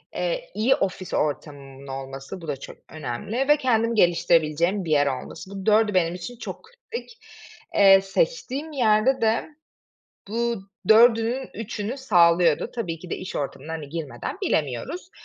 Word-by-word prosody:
eee, - - -2
iyi 235 +5 +3
ofis 190 -1 -3
ortamımın 140 -2 -3
olması, 135 +6 -7
bu 165 - -9
da 145 - -1
çok - - -10
önemli 155 - -3
ve 295 0 +6
kendimi 230 -4 +1
geliştirebileceğim 170 0 +2
bir 155 - -3
yer 145 -1 +4
olması. 135 +7 -5
Bu 195 -1 -7
dördü 215 0 +4
benim 175 -2 +2
için 205 +7 -8
çok - - -7
kritik. 470 0 -10 0.6
Eee, 195 -1 +7
seçtiğim 315 - -1
yerde 245 -1 +2
de 225 +7 +1 0.8
bu 235 -2 -1 0.3
dördünün 230 +3 +5
üçünü 225 +2 -4
sağlıyordu. 170 - +3
Tabii 175 -9 -3
ki 180 +1 -11
de - - -1
iş 185 - -6
ortamına, 145 +2 -5
hani, 155 -3 -5
girmeden 165 - -5
bilemiyoruz. 155 - -2
195 Hz, 145 wpm, -24 LUFS, 160-240 Hz, 0.8 s, Eee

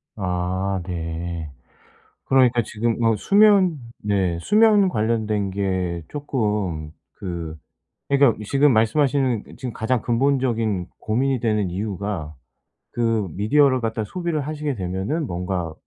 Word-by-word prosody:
아 95 0 -1
네. 85 -2 -4 0.8
그러니까 125 -3 +4
지금 115 +2 -2
어 115 -1 +4
수면 200 - +4 0.2
네 95 -5 0
수면 210 - +5
관련된 110 - 0
게 95 -3 -2
쪼끔 105 - -2 0.2
그 85 -4 -5 0.5
그러니까 140 -4 +4
지금 140 +4 +3
말씀하시는 125 +1 +2
지금 125 -2 -5
가장 115 +1 0
근본적인 115 -6 0
고민이 130 +4 0
되는 105 -4 0
이유가 95 -5 -4 0.6
그 115 -4 0
미디어를 130 - +3
갖다 115 -1 -2
소비를 170 - -2
하시게 150 -1 -3
되면은 95 - -2
뭔가 90 -3 -3
110 Hz, 250 characters per minute, -22 LUFS, 95-135 Hz, 0.8 s, 수면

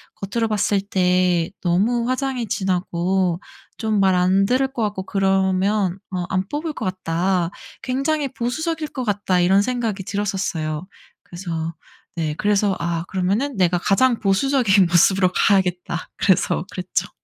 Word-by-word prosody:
겉으로 225 +4 -2
봤을 205 -2 +1
때 180 -3 +1
너무 225 +7 +1
화장이 255 -2 -1
진하고 185 -1 0 0.4
좀 220 -2 0
말 190 -1 +4
안 185 +2 +3
들을 260 +3 +2
것 235 - -2
같고 205 -3 -2
그러면 195 0 +1 0.2
어 180 -1 -2
안 190 +1 -1
뽑을 305 +2 -3
것 - - -5
같다. 180 -1 -1 0.3
굉장히 275 +3 -1
보수적일 310 +6 -3
것 260 - -4
같다.' 205 -4 0
이런 190 +3 +4
생각이 225 -4 -2
들었었어요. 185 -5 -2 0.4
그래서 165 -2 -5 0.4
네 160 -3 -1
그래서 205 -1 +2
아 170 -1 -2
'그러면은 200 +9 -1
내가 180 -1 +3
가장 230 +7 +2
보수적인 200 -2 +3
모습으로 180 +2 +4
가야겠다.' 180 -3 +1
그래서 185 -2 +2
그랬죠. 185 +2 -2
195 Hz, 300 characters per minute, -21 LUFS, 180-220 Hz, 0.4 s, 말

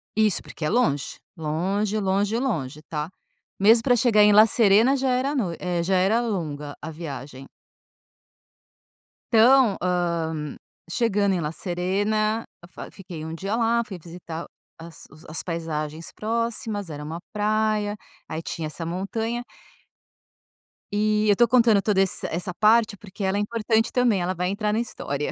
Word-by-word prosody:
Isso, 215 -3 +2
porque 155 - -7
é - - +1
longe. 145 - 0 0.2
Longe, 190 +7 -1
longe, 200 +3 +1
longe, 155 - -2
tá. 150 +1 -4 0.5
Mesmo 225 +3 +6
para 245 -2 +4
chegar 225 -3 +4
em 210 0 +6
La 215 +1 +8
Serena, 230 +1 +4
já 265 -1 0
era 260 +4 0
no 190 -10 -1
eh, 175 -2 -1
já 190 +2 +1
era 200 +6 +3
longa, 150 -10 -4
a 155 - -6
viagem. 135 -4 -8 1.8
Então, 235 -1 +5
hã, 170 -4 -1 0.3
chegando 205 -2 +1
em - - -1
La 150 -1 -2
Serena, 205 +6 -1 0.3
fa - - -9
fiquei 175 -5 -9
um 160 - -6
dia 195 +5 -2
lá, 235 0 +2
fui 190 -4 -8
visitar 170 0 -8 0.3
as 165 -1 -11
os 155 - -16
as 155 - -2
paisagens 160 -2 -4
próximas. 220 -3 -2
Era 150 -1 -6
uma 160 +3 -6
praia, 215 0 0 0.3
aí 160 0 -4
tinha 165 -1 -5
essa 165 +2 -5
montanha 225 +7 -3 1.5
e, 210 +1 +1
eu - - +7
estou 240 +4 +4
contando 230 -4 +4
toda 200 -3 +2
ess 190 - -1
essa 180 +3 -3
parte, 215 +1 +3
porque 200 0 -9
ela 190 +1 +1
é - - +1
importante 225 +1 0
também. 240 -7 +2
Ela 180 +2 -1
vai 180 +1 -2
entrar 210 +1 -1
na 220 - +1
história. 150 -11 -3
200 Hz, 155 wpm, -24 LUFS, 165-220 Hz, 1.8 s, La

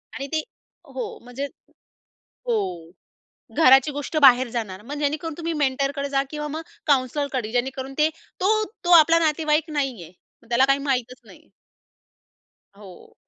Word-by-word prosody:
आणि 275 - -5
ते 315 - 0 0.5
हो - - -3 0.2
म्हणजे 245 +3 -5 1.0
हो. 470 -2 +1 1.0
घराची 270 -2 +6
गोष्ट 290 +2 -4
बाहेर 260 -2 +7
जाणार. 210 -5 -5
मग 275 +7 -8
जेणेकरून 300 +2 -2
तुम्ही 335 0 -3
मेंटरकडे 275 +1 -1
जा 275 -1 +1
किंवा 300 -1 -5
मग 310 +2 -5 0.3
काउंसलरकडे 260 -3 0
जेणेकरून 265 +2 -2
ते 305 +1 +4 0.3
तो 430 +3 +3 0.2
तो 355 - +1
आपला 330 +2 +5
नातेवाईक 310 0 +1
नाहीये. 260 - -3 0.3
मग 230 - -22
त्याला 240 +3 +4
काही 275 +1 +3
माहितचं 250 -1 -2
नाहीये. - - -17 1.3
हो. 195 -4 -14
275 Hz, 135 wpm, -23 LUFS, 255-305 Hz, 1.3 s, बाहेर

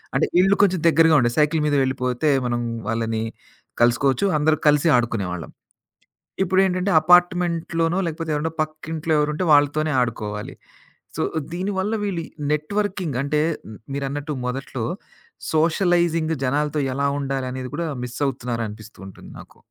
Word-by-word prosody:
అంటే - - +2
ఇళ్ళు 195 +2 +4
కొంచెం 185 -3 +3
దగ్గరగా 165 0 +5
ఉండే. 120 -1 +2
సైకిల్ 150 +1 +3
మీద 150 -1 +1
వెళ్ళిపోతే, 130 +2 -1 0.2
మనం 120 0 -1 0.3
వాళ్ళని 115 -1 -1 0.6
కలుసుకోవచ్చు, 130 +6 +3
అందరూ 155 +1 +2
కలిసి 150 +2 +4
ఆడుకునేవాళ్ళం. 100 -8 -3 0.9
ఇప్పుడేంటంటే 190 +1 +1
అపార్ట్‌మెంట్‌లోనో 175 0 +2
లేకపోతే 160 0 -4
ఏవరన్న 160 +2 -2
పక్కింట్లో 155 +1 -3
ఎవరుంటే, 150 +4 0
వాళ్ళతోనే 145 +1 +3
ఆడుకోవాలి. 105 -3 -4 0.6
సో, - - -1 0.3
దీనివల్ల 190 +3 -2
వీళ్ళు 175 -5 -2 0.3
నెట్‌వర్కింగ్ 180 -2 -2
అంటే, 150 +1 +1 0.5
మీరన్నట్టు 140 +2 -3
మొదట్లో 130 -2 -4 0.7
సోషలైజింగ్ 165 0 +2
జనాలతో 150 +2 0
ఎలా 140 0 +1
ఉండాలనేది 130 -2 -4
కూడా, 170 +1 -2 0.2
మిస్ 125 +2 -8
అవుతున్నారానిపిస్తూంటుంది 110 -6 -6
నాకు. - - -15
150 Hz, 115 wpm, -22 LUFS, 125-170 Hz, 0.9 s, దగ్గరగా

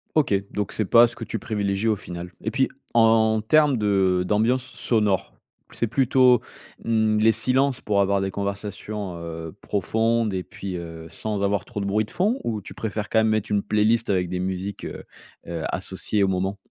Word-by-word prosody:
OK, 150 -9 +3 0.2
donc 105 0 -3
c'est 110 -2 -1
pas 115 +4 +7
ce - - -5
que 115 - -7
tu 115 +1 -4
privilégie 100 -1 -1
au 110 - +3
final 90 -3 -8
et - - -1
puis - - +2 0.3
en 110 -1 +4
termes 145 +3 +4
de 95 -4 +2
d'ambiance 115 +5 +2
sonore. 110 -6 0 0.4
C'est 120 - -1
plutôt, 125 0 +4 0.4
mmh, 110 -1 +2
les 110 +1 +5
silences 130 +4 +1
pour 100 -4 +1
avoir 100 0 +2
des 95 0 -2
conversations, 100 0 -4
heu, 80 0 -7
profondes 110 +2 0
et 95 - -1
puis, 95 0 -7
heu, 85 -1 -8
sans 105 +4 -3
avoir 100 -1 +1
trop 115 - -6
de 100 - -2
bruit 105 +2 +1
de - - -15
fond? 215 +8 0
Ou 110 -2 -2
tu 100 - -10
préfères 105 -1 -4
quand 110 - +2
même 110 - +3
mettre 110 -2 0
une 105 -1 +2
playlist 110 +3 +1
avec 90 -3 +1
des 90 0 -3
musiques, 95 +2 -4
heu - - -7 0.4
heu, 85 -1 -4
associées 105 -2 -1
au - - +3
moment? 95 +1 -1
105 Hz, 195 wpm, -24 LUFS, 95-115 Hz, 0.4 s, pas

